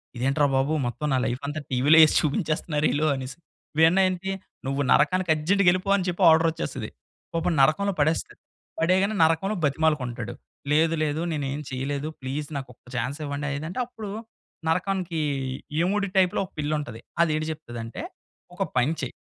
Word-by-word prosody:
ఇదేంట్రా 135 +4 +2
బాబు 135 +3 +2
మొత్తం 120 +5 -3
నా - - +3
లైఫంతా 140 +5 -3
టీవీ‌లో 140 +6 +5
ఏసి 155 - 0
చూపించేస్తున్నారీళ్ళు 155 -2 0
అనేసి. 130 +2 -6 0.4
ఇవన్నేంటి 185 +3 +3 0.4
నువ్వు 135 +1 -1
నరకానికి 180 +4 +3
అర్జెంట్‌గా 185 +6 +2
ఎళ్ళిపో 185 +2 -2
అని 185 - -2
చెప్పి 180 +2 -2
ఆర్డర్ 160 +1 +5
వచ్చేస్తది. 160 - -5 0.4
పాపం 165 +1 0
నరకంలో 195 +9 +3
పడేస్తది, 155 +3 0 0.4
పడేయగానే 190 +5 +2
నరకంలో 165 +6 +2
బతిమాలుకుంటాడు. 140 -6 0 0.4
"లేదు 160 +2 +3
లేదు 150 +1 -1
నేనేం 145 -2 -2
చేయలేదు 140 +3 -3
ప్లీజ్ 140 +3 -4
నాకొక్క 130 -3 -9
చాన్సివ్వండనేది" 145 +3 -3
అంటే 185 - -5
అప్పుడు 225 -4 -8 0.6
నరకానికి 180 -1 -1 0.6
యముడి 200 +4 +1
టైప్‌లో 185 -2 +3
ఒక - - -18
పిల్లుంటది. 145 -6 -3 0.2
అది 165 - +1
ఏటి 155 0 -1
చెప్తదంటే, 120 - -7 0.5
"ఒక 180 - -9 0.2
పని 125 +6 +3
చేయి. 130 - -4
155 Hz, 135 wpm, -25 LUFS, 140-180 Hz, 0.6 s, టీవీ‌లో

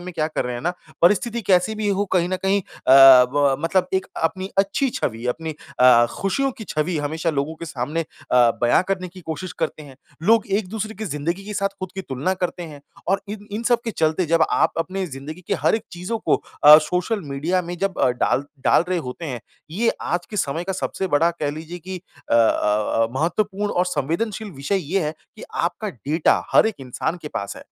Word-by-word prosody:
में 180 0 -7
क्या 155 -2 0
कर 155 - -2
रहे 125 0 -3
हैं 120 - -5
ना, 175 - 0 0.3
परिस्थिति 215 +6 +3
कैसे 185 +3 +2
भी 215 -1 -2
हो, 200 0 +1
कहीं 175 -1 +2
न 185 - -1
कहीं 195 +1 +3
अ, 130 - -1 0.4
ब 140 -2 +3
मतलब 180 +2 +1
एक 190 - 0 0.2
अपनी 185 +4 -1
अच्छी 200 +8 +2
छवि, 115 - -3
अपनी 160 +6 -2 0.3
अ, 125 -2 +7
खुशियों 270 +8 -1
की 220 - -8
छवि 155 +3 -1
हमेशा 160 +3 -1
लोगों 150 +2 -2
के 170 - -7
सामने 150 +1 -3
अ, 125 -5 +2
बयान 120 +8 +4
करने 185 -2 -2
की 185 +1 -13
कोशिश 165 +1 -5
करते 155 -1 -2
हैं, 140 -3 -13 0.3
लोग 225 +3 +4
एक-दूसरे 215 +2 -2
की 215 +2 -6
ज़िंदगी 170 +3 -3
के 210 0 -6
साथ 195 0 +1
खुद 185 -1 -6
की 190 - -4
तुलना 140 +5 -2
करते 180 -1 -3
हैं 150 -4 -9 0.3
और 195 +2 +2
इन 210 0 -7
इन 215 +3 -4
सब 235 0 +2
के 230 - -2
चलते 160 -2 0
जब 165 +1 +3
आप - - +2
अपनी 185 +3 -2
ज़िन्दगी 150 +4 -8
के 200 - +2
हर - - +2
एक 220 - -1
चीज़ों 180 +6 -4
को - - +2 0.3
अ, 150 +1 +12
सोशल 180 +7 -1
मीडिया 170 +7 0
में 175 +1 -6
जब 195 -1 -2
अ, - - +4
डाल 125 +2 0 0.2
डाल - - +5
रहे 185 -1 +1
होते 140 +3 -6
हैं, 125 -6 -4 0.3
ये 220 +8 +1
आज 175 +1 -2
के 210 - -5
समय 165 -1 -1
का, 190 - -2
सबसे 190 +1 -3
बड़ा 165 +1 +3
कह 155 -4 -3
लीजिए 160 +4 -7
कि 185 +1 -7 0.3
अ - - +3
अ 110 -1 +2
अ, - - 0
महत्वपूर्ण 200 +7 -1
और 180 +1 +1
संवेदनशील 180 - -2
विषय 140 +7 -1 0.2
ये 195 - +3
है 150 - -2 0.2
कि - - -11
आपका - - -1
डेटा, 150 +7 +1
हर - - +6
एक 220 - -1
इंसान 135 +6 -3
के 150 - -5
पास 100 -6 -5
है। - - -10
175 Hz, 220 wpm, -22 LUFS, 150-195 Hz, 0.4 s, अ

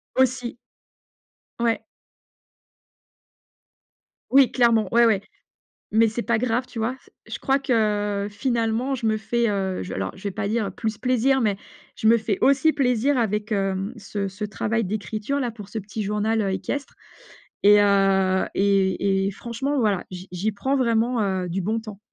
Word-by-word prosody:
Aussi. 255 -2 +1 1.0
Ouais. 235 -1 +1 2.5
Oui, 270 -1 +6
clairement, 230 -5 +3
ouais, 235 0 +6
ouais. 210 -4 +3 0.7
Mais 225 +1 +5
c'est 225 +2 -3
pas 235 -1 +1
grave, 245 +1 0
tu 230 - -7
vois? 235 +4 -1
Ce - - -23 0.2
je - - -3
crois 270 +1 +1
que 210 -5 0
finalement 235 +3 0
je 230 - -5
me 215 0 +2
fais, 235 +1 0
heu, 190 - -2
je - - -6
alors 95 0 -3
je 190 - -14
vais 200 - -2
pas 200 0 -3
dire 215 -3 -1
plus 220 -2 -3
plaisir, 255 +1 +2
mais 205 -3 +1 0.4
je 220 - +1
me 230 +1 +6
fais 215 -3 -1
aussi 280 +3 +4
plaisir 260 -1 +1
avec, 210 -1 -1
hem, 195 +1 -1
ce 200 -1 -4
ce 205 +2 -5
travail 215 +2 -1
d'écriture 215 +6 -3
là 240 -2 -1
pour 210 -3 -10
ce 220 +2 -5
petit 210 +2 -6
journal, 210 +2 0
heu, 195 - 0
équestre. 280 +8 -4 0.7
Et, 205 0 +7
heu, 195 -2 +3
et 195 0 +2
et - - 0
franchement, 240 +7 -3
voilà, 210 -6 +1
j'y 185 +1 -8
j'y 195 +5 -1
prends 265 +7 -1
vraiment, 235 -1 +1
heu, 190 -2 -1
du 190 +3 -2
bon 220 +4 0
temps. 215 -3 -10
220 Hz, 170 wpm, -24 LUFS, 200-235 Hz, 2.5 s, Et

